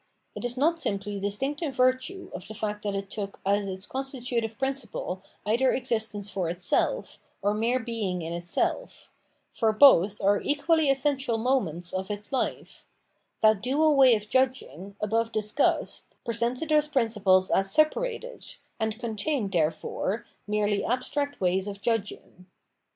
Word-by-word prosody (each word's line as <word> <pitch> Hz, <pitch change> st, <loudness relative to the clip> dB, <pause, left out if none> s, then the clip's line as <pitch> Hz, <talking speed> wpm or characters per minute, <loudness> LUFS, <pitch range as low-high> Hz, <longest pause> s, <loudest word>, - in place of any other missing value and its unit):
It -, -, -7 dB
is 245 Hz, +1 st, -2 dB
not 330 Hz, +5 st, +2 dB
simply 200 Hz, -6 st, -2 dB
distinct 265 Hz, -, -2 dB
in 310 Hz, -4 st, -1 dB
virtue 260 Hz, +9 st, 0 dB
of 180 Hz, -, -7 dB
the 220 Hz, -, -8 dB
fact 210 Hz, -1 st, -3 dB
that 205 Hz, -1 st, -2 dB
it 195 Hz, 0 st, -5 dB
took 200 Hz, -1 st, -5 dB
as 200 Hz, +1 st, +1 dB
its 190 Hz, +1 st, -5 dB
constitutive 245 Hz, -4 st, -3 dB
principle 265 Hz, -8 st, -3 dB, 0.2 s
either 240 Hz, +5 st, +3 dB
existence 220 Hz, -5 st, -1 dB
for 185 Hz, -4 st, -2 dB
itself, 180 Hz, -, -1 dB, 0.2 s
or 205 Hz, +1 st, +2 dB
mere 230 Hz, +4 st, +1 dB
being 220 Hz, -7 st, -3 dB
in 165 Hz, +1 st, -4 dB
itself; 175 Hz, -, -2 dB, 0.4 s
for 225 Hz, -2 st, +1 dB
both 210 Hz, -5 st, +6 dB
are 200 Hz, +1 st, +2 dB
equally 295 Hz, +1 st, +2 dB
essential 270 Hz, -3 st, +1 dB
moments 195 Hz, -, 0 dB
of 190 Hz, +1 st, -3 dB
its 210 Hz, 0 st, -6 dB
life: 265 Hz, -, -3 dB, 0.5 s
that 215 Hz, -2 st, +4 dB
dual 295 Hz, +4 st, +3 dB
way 260 Hz, -3 st, +7 dB
of 210 Hz, 0 st, -5 dB
judging, 210 Hz, -, -1 dB
above 225 Hz, +2 st, 0 dB
discussed, 215 Hz, +6 st, 0 dB, 0.2 s
presented 235 Hz, +5 st, -1 dB
those 300 Hz, -1 st, +3 dB
principles 210 Hz, -9 st, +2 dB
as 195 Hz, 0 st, +3 dB
separated, 485 Hz, -, 0 dB, 0.2 s
and 220 Hz, 0 st, -1 dB
contained, 230 Hz, 0 st, -2 dB
therefore, 170 Hz, +5 st, -1 dB, 0.2 s
merely 210 Hz, -1 st, 0 dB
abstract 285 Hz, +4 st, -1 dB
ways 185 Hz, +1 st, +1 dB
of 200 Hz, -1 st, -6 dB
judging. 200 Hz, -4 st, -3 dB
225 Hz, 145 wpm, -27 LUFS, 200-265 Hz, 0.5 s, way